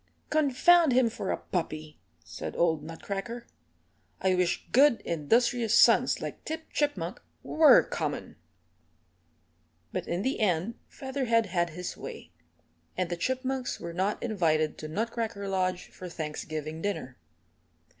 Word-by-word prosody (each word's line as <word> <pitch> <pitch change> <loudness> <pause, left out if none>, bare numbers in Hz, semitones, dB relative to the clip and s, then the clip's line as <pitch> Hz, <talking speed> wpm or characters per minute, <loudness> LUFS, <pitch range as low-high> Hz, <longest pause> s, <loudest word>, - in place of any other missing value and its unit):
"Confound 310 +1 +5
him 245 -2 +4
for 195 - -4
a - - 0
puppy," 155 -3 -4 0.2
said - - -7
old 160 -3 +2
Nutcracker. 195 +8 -5 0.7
"I 190 -1 +2
wish 180 -1 0
good, 270 -2 +5
industrious 225 +8 +2
sons - - +5
like - - -6
Tip 320 0 -6
Chipmunk 290 0 -1 0.2
were 310 -1 +6
common." - - -4 1.6
But - - -3
in 175 +3 -1
the 265 +3 -1
end 190 0 +1
Featherhead 260 -4 0
had 175 -3 0
his 180 +2 -6
way, - - -9 0.7
and 180 -1 -1
the - - 0
Chipmunks 260 +6 -2
were 170 0 -6
not 190 +4 -1
invited 160 -9 +1
to 155 - -5
Nutcracker 220 +2 -3
Lodge 185 -2 -1
for 180 - -9
Thanksgiving 155 0 -5
dinner. 165 -10 -4
195 Hz, 125 wpm, -29 LUFS, 170-245 Hz, 1.6 s, were